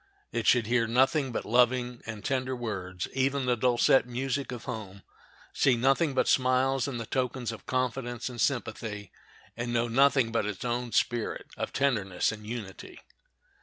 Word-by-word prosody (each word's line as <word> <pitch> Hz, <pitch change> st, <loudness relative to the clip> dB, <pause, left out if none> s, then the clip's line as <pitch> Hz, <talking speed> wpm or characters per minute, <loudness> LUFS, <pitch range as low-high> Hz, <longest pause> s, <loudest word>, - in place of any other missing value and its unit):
It -, -, -2 dB
should 120 Hz, -3 st, +5 dB
hear 115 Hz, 0 st, +2 dB
nothing 130 Hz, +3 st, +2 dB
but -, -, -3 dB
loving 125 Hz, 0 st, +2 dB
and 110 Hz, -3 st, -7 dB
tender 130 Hz, -1 st, -1 dB
words, 95 Hz, -7 st, -4 dB
even 135 Hz, 0 st, +1 dB
the 125 Hz, -1 st, +2 dB
dulcet 125 Hz, +2 st, +3 dB
music 135 Hz, +3 st, -2 dB
of 120 Hz, -2 st, -6 dB
home; 100 Hz, -5 st, -7 dB, 0.5 s
see 130 Hz, -3 st, +3 dB
nothing 135 Hz, +4 st, +2 dB
but -, -, +2 dB
smiles 130 Hz, +1 st, +2 dB
and 130 Hz, -4 st, -4 dB
the 115 Hz, -, -4 dB
tokens 125 Hz, -1 st, -2 dB
of 110 Hz, -3 st, -10 dB
confidence 125 Hz, -1 st, -2 dB
and 120 Hz, -3 st, -5 dB
sympathy, 110 Hz, -5 st, -2 dB, 0.4 s
and 120 Hz, +1 st, -3 dB
know 120 Hz, 0 st, +1 dB
nothing 135 Hz, 0 st, +3 dB
but 115 Hz, -2 st, 0 dB
its 105 Hz, +2 st, -5 dB
own 120 Hz, 0 st, -2 dB
spirit 120 Hz, +1 st, 0 dB
of -, -, -4 dB
tenderness 110 Hz, -11 st, +1 dB
and 105 Hz, -1 st, -9 dB
unity. 110 Hz, -5 st, -7 dB
120 Hz, 165 wpm, -28 LUFS, 115-130 Hz, 0.5 s, should